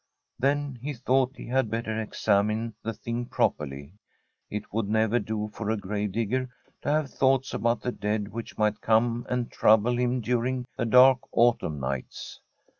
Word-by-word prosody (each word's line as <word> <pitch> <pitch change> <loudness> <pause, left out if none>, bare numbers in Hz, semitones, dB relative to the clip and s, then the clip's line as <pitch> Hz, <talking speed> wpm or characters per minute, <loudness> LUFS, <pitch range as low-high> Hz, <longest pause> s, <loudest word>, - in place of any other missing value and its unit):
Then 140 -1 0
he 145 +2 -4
thought 130 +2 +1
he - - -8
had 130 -2 0
better 110 0 -2
examine 110 +1 0
the 115 - -3
thing 120 +2 -4
properly. 70 +1 -2 0.6
It 105 -1 -6
would 110 -2 -1
never 110 +2 +2
do 105 0 -3
for 110 -2 -4
a 110 - +1
grave 105 0 -3
digger 120 +4 -1 0.3
to - - -3
have 150 -2 +1
thoughts 135 -1 +2
about 115 -1 0
the 125 - -2
dead 105 -2 -2
which 115 +1 -7
might 105 -1 +1
come 115 +2 +2
and 125 -1 -1
trouble 110 +3 +4
him 125 +1 +1
during 125 +2 -1
the 120 - -1
dark 125 +2 +7
autumn 115 -11 +2
nights. 65 -1 -5
115 Hz, 165 wpm, -27 LUFS, 105-125 Hz, 0.6 s, dark